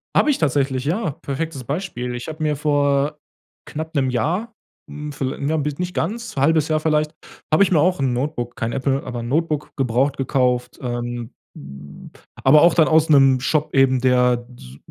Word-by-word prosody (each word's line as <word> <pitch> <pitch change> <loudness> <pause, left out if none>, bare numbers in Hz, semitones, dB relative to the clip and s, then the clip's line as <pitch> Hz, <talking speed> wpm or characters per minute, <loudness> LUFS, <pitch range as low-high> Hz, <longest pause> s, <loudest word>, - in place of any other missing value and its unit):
Habe - - +4
ich 280 - 0
tatsächlich, 135 -3 0
ja, 170 +3 -1
perfektes 140 +1 -5
Beispiel. 130 -4 -4
Ich 120 - -7
habe 160 0 -7
mir 150 -1 +1
vor 145 0 +1 0.5
knapp 160 +2 -6
'nem 135 -2 +1
Jahr, 175 - -1 0.4
hm 150 0 -7
viel 135 -1 -3
hm, 140 - -3
ja 160 - +1
nicht 150 +5 -3
ganz, 220 +7 -3
1/2 155 +2 +3
Jahr 155 0 +2
vielleicht, 155 0 0 0.4
habe 155 +5 +5
ich 195 - 0
mir 165 - +4
auch 180 +3 +2
'n 135 -2 +1
Notebook- 120 -2 -3
kein 115 0 -3
Apple- 135 +1 -1
aber 125 -2 -5
'n 115 - -5
Notebook 150 +2 -1
gebraucht 135 +2 0
gekauft, 125 -2 0
ähm, 120 -2 -4 0.2
hm, 70 +1 -11 0.3
aber 150 - +6
auch 170 +1 +6
dann 160 -3 +4
aus 160 0 +3
'nem 135 -3 +5
Shop 150 +4 -1
eben, 135 -1 +4
der 125 -1 +2
s 65 +1 -13
140 Hz, 185 wpm, -21 LUFS, 125-155 Hz, 0.5 s, aber